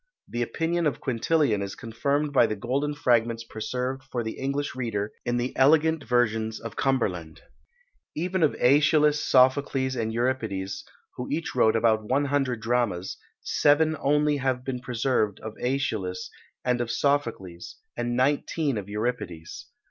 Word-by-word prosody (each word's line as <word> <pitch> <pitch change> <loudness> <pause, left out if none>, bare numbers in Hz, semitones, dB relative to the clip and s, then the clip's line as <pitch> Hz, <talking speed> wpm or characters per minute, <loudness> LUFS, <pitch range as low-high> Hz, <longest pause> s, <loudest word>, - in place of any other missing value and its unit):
The 120 - -4
opinion 165 +7 0
of 150 - -2
Quintilian 130 -2 +1
is 100 0 -4
confirmed 140 +5 -1
by 120 -4 +5
the 110 - -2
golden 135 +7 -2
fragments 115 -4 +1
preserved 125 +4 -4
for 125 -3 -4
the 110 - -3
English 140 +1 -3
reader 110 -5 -2
in 120 0 0
the 120 +1 -2
elegant 160 +3 +4
versions 110 -2 +1
of 115 -1 -8
Cumberland. 90 -12 -1 0.7
Even 180 +3 -1
of 155 - +3
Æschylus, 150 +3 +4
Sophocles, 130 0 +3
and 110 -2 -2
Euripides, 110 -5 -2 0.3
who 125 - -4
each 160 +3 -2
wrote 110 - +3
about 110 -1 +3
one 140 +3 +2
hundred 135 -5 0
dramas, 110 -6 -1 0.2
seven 155 +2 +3
only 150 +1 +2
have 130 -2 -1
been 130 -2 -3
preserved 120 -4 0
of 110 -1 -6
Æschylus 110 -8 -2 0.4
and 125 -1 +1
of 120 - -3
Sophocles, 115 -10 -1 0.2
and 120 0 -2
nineteen 140 0 +1
of 100 0 -9
Euripides. 105 -7 -4
125 Hz, 145 wpm, -26 LUFS, 110-140 Hz, 0.7 s, by